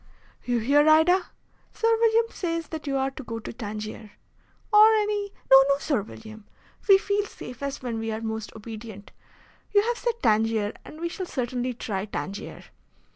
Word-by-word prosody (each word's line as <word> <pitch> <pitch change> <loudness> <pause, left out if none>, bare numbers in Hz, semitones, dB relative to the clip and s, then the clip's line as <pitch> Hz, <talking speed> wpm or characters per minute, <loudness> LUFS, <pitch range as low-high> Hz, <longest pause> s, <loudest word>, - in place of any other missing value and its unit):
"You 245 -1 0
hear, 285 +6 +4
Ida? 350 +4 +5 0.5
Sir 455 0 +3
William 455 0 +4
says 335 -2 -3
that 315 -2 -7
you 275 -1 0
are 270 0 0
to 275 - -9
go 230 -1 -5
to 225 - -7
Tangier." 215 -1 -7 0.6
"Or 430 +1 +8
any 415 -1 0
" - - -33
"No, 270 0 +10
no, 280 - +4
Sir 280 -5 0
William! 220 +1 -11 0.4
We 390 - +9
feel 405 +1 0
safest 270 -1 -7
when 235 -3 -3
we 225 0 -3
are 220 - -3
most 220 -1 -4
obedient. 220 -2 -9 0.6
You 405 - +6
have 475 +1 -1
said 475 -2 -1
Tangier, 220 -1 +2
and 310 - -12
we 340 - -2
shall 360 +2 -5
certainly 250 -2 -3
try 200 -4 -3
Tangier." 195 0 -6
255 Hz, 175 wpm, -26 LUFS, 220-355 Hz, 0.6 s, No